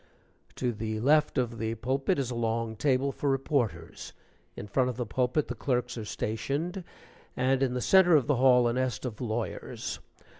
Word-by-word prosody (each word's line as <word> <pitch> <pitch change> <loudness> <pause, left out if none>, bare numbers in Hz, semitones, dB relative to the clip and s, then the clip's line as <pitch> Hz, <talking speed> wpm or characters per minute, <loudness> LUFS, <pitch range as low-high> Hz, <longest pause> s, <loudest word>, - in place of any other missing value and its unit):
To 125 -2 -1
the 110 -1 -4
left 150 +6 +3
of 120 -2 -1
the 110 +1 -2
pulpit 135 +5 0
is 130 -3 -2
a - - -4
long 115 -1 -1
table 135 +3 +1
for 140 - -2
reporters; 125 - -2 0.4
in - - -7
front 125 +5 +1
of 125 - -5
the 125 - -2
pulpit 125 +6 0
the - - -3
clerks 125 -2 -1
are 115 -3 -5
stationed, 145 - -3 0.5
and 130 +1 +2
in 130 -2 +1
the 125 - -1
centre 180 0 +6
of 145 - +4
the 145 -3 +1
hall 125 -1 +5
a 120 - +1
nest 130 -1 -2
of 120 -2 -5
lawyers. 115 -1 -4
125 Hz, 185 wpm, -28 LUFS, 115-135 Hz, 0.5 s, centre